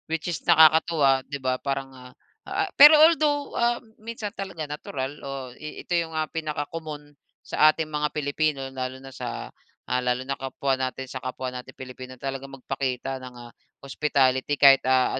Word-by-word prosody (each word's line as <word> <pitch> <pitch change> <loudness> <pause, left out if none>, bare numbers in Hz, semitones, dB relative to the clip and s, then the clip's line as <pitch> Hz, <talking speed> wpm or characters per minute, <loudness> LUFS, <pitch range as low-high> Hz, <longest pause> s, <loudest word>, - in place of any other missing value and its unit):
Which 160 -1 -2
is 170 - -4
nakakatuwa, 155 -4 +5
di 145 - -3
ba. 130 -1 -2
Parang, 135 -1 -3
ah 125 -1 -13 0.4
ah, 390 +1 -1
pero 300 +2 +9
although, 300 -2 +4
ah, 235 0 +1 0.2
minsan 220 -2 -6
talaga 190 -5 -5
natural 145 -1 -6
o 135 -2 -6
i 155 +4 -9
ito - - -3
yung 165 -1 0
ah 155 - +1
mga - - -29
pinakakomon 150 -1 -5 0.3
sa 155 - +5
ating 155 0 -1
mga 150 0 -1
Pilipino, 150 0 -1
lalo 130 0 -4
na 135 0 -12
sa, 65 - -6 0.4
ah, 125 0 0
lalo 125 +1 -1
na 135 - -2
kapwa 135 +1 -2
natin 130 0 -3
sa 130 0 -7
kapwa 130 0 -5
natin 125 0 -8
Pilipino, 130 0 -9
talagang 135 +1 -6
magpakita 135 0 -3
ng 125 -1 -10
ah 120 0 -11 0.3
hospitality 135 0 +1
kahit, 135 -1 +7
ah, 130 0 +3
140 Hz, 175 wpm, -25 LUFS, 130-155 Hz, 0.4 s, pero